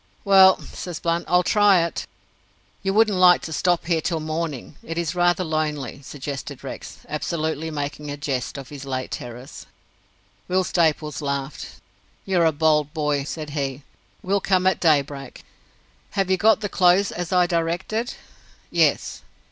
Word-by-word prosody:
"Well," 190 -1 +7
says 175 -3 -7
Blunt, 170 0 -1
"I'll 180 +1 +3
try 200 -2 +4
it." 170 - -5 0.7
"You 195 - 0
wouldn't 210 -2 +3
like 180 -1 +6
to 160 - -5
stop 175 +1 +1
here 165 -2 +1
till 165 0 -1
morning? 155 -2 -4
It 165 +1 -6
is 170 -2 -1
rather 175 +1 +2
lonely," 150 -5 -2
suggested 140 0 -7
Rex, - - -8
absolutely 160 0 -2
making 145 -1 -5
a 145 - -4
jest 140 -3 -3
of 135 -2 -8
his 145 -2 -8
late 130 -2 -4
terrors. 125 +3 -8 0.8
Will 185 +1 +2
Staples 155 -5 0
laughed. 140 0 -4 0.5
"You're 180 -3 +2
a 160 - +4
bold 150 0 +1
boy!" 150 -2 0
said 150 0 -6
he. 140 -2 -3 0.4
"We'll 200 +1 +1
come 185 -1 +2
at 190 - +3
daybreak." 140 -4 0 0.7
"Have 195 -1 +1
you 190 - +3
got 215 +3 +4
the 205 - -1
clothes 185 +1 +3
as 175 -1 -5
I 180 -1 +4
directed?" 175 +7 -2 0.6
"Yes." - - +1
160 Hz, 155 wpm, -23 LUFS, 145-180 Hz, 0.8 s, Well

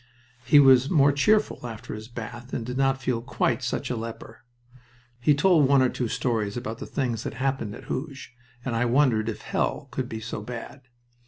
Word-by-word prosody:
He 130 +4 +5
was 135 -1 +6
more 145 -4 +5
cheerful 210 - +1
after 110 -2 -7
his 110 0 -8
bath 120 +1 -8
and 115 - -3
did 125 +1 -5
not 135 0 +2
feel 125 -3 -1
quite 120 - 0
such - - -2
a - - -1
leper. 115 0 -8 0.8
He 145 +4 +3
told 155 -2 +4
one 135 -1 +5
or 130 - +3
two 125 - -2
stories 115 -3 -1
about 115 -1 -5
the - - -6
things 120 -6 -2
that - - -5
happened 130 -6 -2
at - - -11
Hooge, 135 -1 -6 0.3
and 125 -3 -2
I 120 +2 +1
wondered 120 -3 +2
if 110 - -6
hell - - -2
could 130 -2 -3
be 110 - -5
so 110 -1 -5
bad. 125 +4 -8
125 Hz, 195 wpm, -26 LUFS, 115-135 Hz, 0.8 s, was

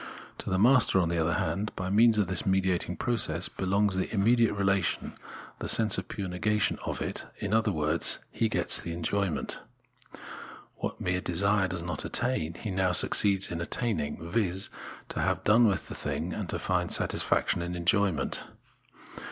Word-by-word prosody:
To - - -5
the 95 - +1
master, 120 0 +5
on 85 -3 +1
the 85 0 -1
other 80 0 +1
hand, 95 +6 -2
by 95 0 -3
means 110 +2 +5
of 105 - +3
this 90 -1 0
mediatiag 95 -2 0
process, 90 -8 0
belongs 100 +1 0
the 95 - 0
imme 115 +3 +2
diate 115 -3 +2
relation, 100 -2 +1
in - - -8 0.5
the - - -4
sense 110 -2 +4
of - - -8
the - - -8
pure 100 -2 -3
negation 100 +4 0
of - - -3
it, - - -5
in 100 0 -3
other 110 -1 +2
words 75 -1 +1
he 115 - 0
gets - - 0
the 85 - -5
enjoyment. 85 +1 -2 1.2
What - - -4
mere 90 0 -1
desire 100 +3 +2
did 90 -2 -5
not 85 - -4
attain, 120 -10 -1
he 105 - -5
now 95 -1 +1
succeeds 100 +1 +4
in 85 0 -3
attaining, 85 -6 -2
viz. 95 -1 -1 0.4
to - - -4
have - - 0
done 115 +3 +5
with 95 -4 -1
the - - -7
thing, 75 +5 -3
and 100 -5 -5
find - - -1
satisfaction - - +1
in 90 +1 -4
enjoyment. 90 -3 0
95 Hz, 175 wpm, -28 LUFS, 85-105 Hz, 1.2 s, master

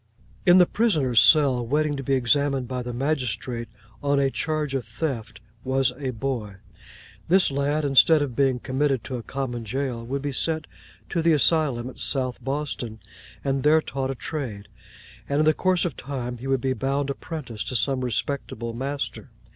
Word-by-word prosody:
In 175 +1 +8
the 180 - +7
prisoner's 155 - +3
cell, 140 -6 +5
waiting 145 +4 +1
to 135 - -4
be 135 +1 +1
examined 135 +1 +1
by 125 0 -3
the 125 0 -5
magistrate 125 -3 -2 0.3
on 140 -1 +2
a 135 -1 +2
charge 155 -2 -1
of 135 -2 -1
theft, 115 -2 -4 0.2
was 130 0 +1
a 135 -2 -2
boy. 115 -4 -3 0.7
This 185 -2 +4
lad, 145 +2 0
instead 145 +3 +6
of 130 -5 -5
being 135 -1 +2
committed 130 0 0
to 130 +1 -4
a - - -5
common 120 -1 -4
jail, 125 +1 -3
would 135 +4 -3
be 145 - -1
sent 160 +4 0 0.4
to 170 - 0
the 165 0 +4
asylum 145 -5 +2
at 130 - -10
South 130 -3 -1
Boston, 135 -5 -3 0.4
and 135 0 0
there 150 +3 +5
taught 135 -3 -3
a 135 - -2
trade; 115 -9 -5 0.6
and 140 - +1
in 155 - +3
the 155 - +5
course 185 +2 +2
of 170 - -2
time 125 -2 -5
he 130 - -6
would 135 -2 +1
be 130 -1 +1
bound 135 +3 -1
apprentice 135 -7 -6
to 125 - -4
some 130 +3 +1
respectable 120 -2 -3
master. 135 +4 -4
135 Hz, 180 wpm, -25 LUFS, 125-145 Hz, 0.7 s, In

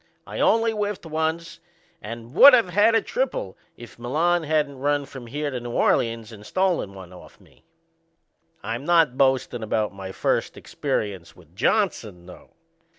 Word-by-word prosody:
I - - -7
only 225 0 +3
whiffed 210 -4 -3
once 160 +1 -3 0.4
and 115 +2 -9
would 275 - +9
of 230 -7 +2
had 210 +5 +3
a - - +2
triple - - -3 0.2
if 120 0 -13
Milan 165 +8 +1
hadn't 150 -3 -1
run 145 +1 0
from 130 -3 -11
here 145 +4 -3
to 125 - -4
New 120 0 -7
Orleans 115 -2 0
and 105 -2 -12
stole 185 - 0
one 95 -2 -12
off 90 - -15
me. - - -24 1.0
I'm 115 +5 -4
not 165 -5 +3
boastin' 130 -3 +1
about 110 -1 -1
my 95 -1 -8
first - - -1
experience 95 -5 -4
with 85 -1 -20
Johnson 110 - -1
though. 90 - -14
135 Hz, 155 wpm, -23 LUFS, 110-175 Hz, 1.0 s, would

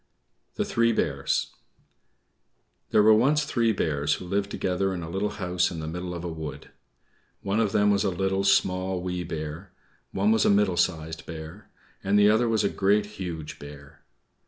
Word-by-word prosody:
THE - - -1
THREE 115 0 +2
BEARS - - -1 1.4
There 105 - +4
were 110 +1 +7
once 140 +7 +3
three 115 -5 +1
bears 75 -7 0
who - - -9
lived 100 +2 -1
together 95 0 -1
in 85 - -5
a 80 - -6
little 100 +3 -1
house 90 -2 0
in 85 - -6
the 80 - -5
middle 90 +2 -5
of 85 - -6
a - - -3
wood. 80 -2 -7 0.7
One 100 +3 0
of 110 -3 +1
them 105 0 +3
was 100 -1 +2
a 100 - +1
Little, 95 +1 -1
Small, 95 -1 +2
Wee 90 0 -3
Bear; 80 +2 -6 0.4
one 100 +3 +1
was 110 -1 +3
a - - +3
Middle 100 -3 +3
Sized 80 -2 -1
Bear; 80 +5 -9 0.3
and 100 +1 +2
the 105 0 +6
other 115 +2 +2
was 110 -1 +1
a 100 - +2
Great, 100 +2 +2
Huge 90 -7 -7
Bear. 70 +1 -12
95 Hz, 180 wpm, -26 LUFS, 85-105 Hz, 1.4 s, were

